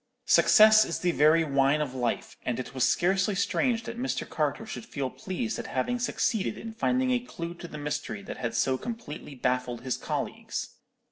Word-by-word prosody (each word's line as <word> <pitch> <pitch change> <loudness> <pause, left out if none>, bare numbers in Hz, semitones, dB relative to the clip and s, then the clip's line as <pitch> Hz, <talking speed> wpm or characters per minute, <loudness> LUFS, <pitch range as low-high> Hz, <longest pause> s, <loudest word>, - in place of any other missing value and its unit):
"Success 215 0 +7
is 165 - -3
the 180 - +1
very 155 +1 +5
wine 140 0 +2
of 145 -4 -2
life, 120 -2 -2
and 125 -1 -2
it 125 0 -6
was 130 -2 0
scarcely 190 +3 +2
strange 235 +4 +1
that 235 - -6
Mr. 260 +2 -2
Carter 155 +7 -1
should 220 - -6
feel 135 - -3
pleased 220 +3 -4
at - - -5
having 245 0 -1
succeeded 225 -3 0
in 225 -1 -7
finding 255 +3 +1
a 250 - +3
clue 170 -8 -6
to 175 0 -9
the 150 - -8
mystery 150 +8 -4
that - - -7
had 115 -2 -3
so 130 +2 +1
completely 190 -11 -7
baffled 125 -2 -1
his 130 0 -2
colleagues. - - -4
170 Hz, 190 wpm, -28 LUFS, 135-220 Hz, -, Success